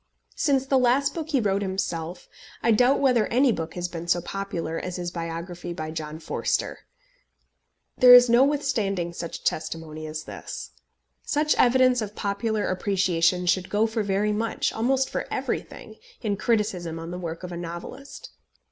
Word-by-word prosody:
Since 270 Hz, -3 st, +1 dB
the 270 Hz, -1 st, +3 dB
last 255 Hz, +3 st, +2 dB
book 320 Hz, -2 st, -5 dB
he 285 Hz, -4 st, +2 dB
wrote 200 Hz, -3 st, +1 dB
himself, 180 Hz, -3 st, -3 dB, 0.4 s
I 230 Hz, -, +4 dB
doubt 250 Hz, +5 st, +4 dB
whether 250 Hz, -6 st, +3 dB
any 255 Hz, +2 st, +3 dB
book 165 Hz, -6 st, -4 dB
has 180 Hz, 0 st, -2 dB
been 170 Hz, -1 st, -7 dB
so 175 Hz, 0 st, +3 dB
popular 170 Hz, -3 st, -4 dB
as 180 Hz, -1 st, -5 dB
his 175 Hz, -1 st, -4 dB
biography 170 Hz, +1 st, -5 dB
by 155 Hz, -1 st, -5 dB
John 155 Hz, -1 st, -5 dB
Forster. 160 Hz, -, -2 dB, 1.2 s
There 250 Hz, -1 st, +10 dB
is 245 Hz, 0 st, +8 dB
no 240 Hz, +2 st, +5 dB
withstanding 220 Hz, -12 st, 0 dB
such 170 Hz, 0 st, -6 dB
testimony 155 Hz, -1 st, -3 dB
as 155 Hz, 0 st, -5 dB
this. -, -, -8 dB, 0.5 s
Such 300 Hz, +1 st, +1 dB
evidence 255 Hz, 0 st, +4 dB
of 210 Hz, -1 st, -5 dB
popular 210 Hz, +2 st, -1 dB
appreciation 180 Hz, -2 st, +1 dB
should 180 Hz, +1 st, +1 dB
go 210 Hz, +2 st, +2 dB
for 220 Hz, 0 st, -1 dB
very 205 Hz, +1 st, 0 dB
much, 225 Hz, +1 st, -1 dB
almost 260 Hz, +4 st, +1 dB
for -, -, -4 dB
everything, 220 Hz, -2 st, -4 dB, 0.2 s
in 205 Hz, -2 st, -1 dB
criticism 200 Hz, -7 st, -1 dB
on 165 Hz, +1 st, -7 dB
the 180 Hz, -, -5 dB
work 170 Hz, 0 st, -6 dB
of 180 Hz, -, -6 dB
a -, -, -5 dB
novelist. 175 Hz, +11 st, -8 dB
195 Hz, 165 wpm, -25 LUFS, 170-245 Hz, 1.2 s, There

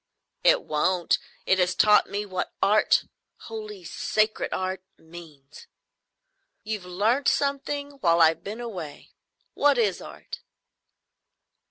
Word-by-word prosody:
"It -, -, +4 dB
won't. 170 Hz, +4 st, +1 dB, 0.3 s
It 190 Hz, -, +2 dB
has 180 Hz, 0 st, +1 dB
taught 210 Hz, -1 st, +5 dB
me 205 Hz, +1 st, -3 dB
what 185 Hz, -2 st, -4 dB
Art—holy 215 Hz, 0 st, -1 dB
sacred 215 Hz, +5 st, -1 dB
Art—means." 175 Hz, -6 st, -8 dB, 1.0 s
"You've 210 Hz, -4 st, -5 dB
learnt 220 Hz, +10 st, +1 dB
something 285 Hz, 0 st, -1 dB
while 170 Hz, -6 st, +3 dB
I've 160 Hz, -1 st, +4 dB
been 215 Hz, +4 st, -6 dB
away. 180 Hz, -11 st, -8 dB, 0.4 s
What 285 Hz, -2 st, +3 dB
is 210 Hz, -6 st, +1 dB
Art?" -, -, -9 dB
195 Hz, 105 wpm, -25 LUFS, 175-220 Hz, 1.0 s, taught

